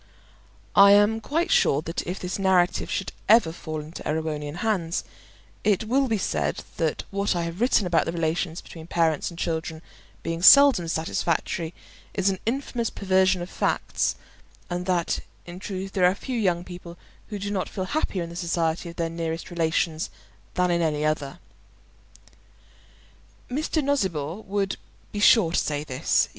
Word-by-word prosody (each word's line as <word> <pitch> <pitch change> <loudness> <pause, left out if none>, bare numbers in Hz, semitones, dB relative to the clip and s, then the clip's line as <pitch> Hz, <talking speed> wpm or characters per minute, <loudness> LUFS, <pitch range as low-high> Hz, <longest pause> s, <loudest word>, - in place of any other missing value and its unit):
I 200 0 +9
am 205 +2 +4
quite 330 - -1
sure 145 +2 +3
that 165 +1 -3
if 180 +2 -3
this 180 +2 -4
narrative 185 -2 +2
should 195 - -2 0.2
ever 220 -7 +6
fall 155 -1 -6
into 155 +2 -9
Erewhonian 150 -1 -3
hands, 175 -5 -1 0.6
it 210 -1 +2
will 265 +5 +2
be 225 -3 +1
said 190 - -1
that 160 -3 -1
what 200 -1 0
I 170 - 0
have 170 +4 -5
written 240 -4 +3
about 170 -2 +2
the - - -2
relations 165 0 -1
between 160 -1 -11
parents 165 -3 +1
and 170 - -11
children 160 -1 -3 0.4
being 165 0 -3
seldom 270 -4 +8
satisfactory 165 +1 -1 0.4
is 195 0 +2
an 190 - -4
infamous 240 -2 -1
perversion 190 -2 +2
of 175 - -8
facts, - - 0 0.6
and 180 +1 -3
that 175 -2 +1 0.3
in 175 +1 -9
truth 195 -1 -5
there 185 -2 +2
are 180 +2 +4
few 255 +5 -5
young 175 -5 +1
people 175 -1 -10 0.3
who 210 - -5
do 200 +1 -4
not 195 -2 -2
feel 190 - -4
happier 195 - -1
in 170 - -7
the - - -9
society 170 -1 -1
of 170 - -10
their 165 -1 -1
nearest 165 +1 -4
relations 165 -1 0 0.5
than 180 -1 +2
in 170 0 +2
any 150 -2 0
other. 155 0 -1 2.1
Mr. 305 +3 0
Nosnibor 190 - -1
would 195 0 -1 0.3
be 205 - -4
sure 205 -4 +6
to - - +2
say 150 -1 -2
this. 130 -4 +1
175 Hz, 165 wpm, -25 LUFS, 165-200 Hz, 2.1 s, I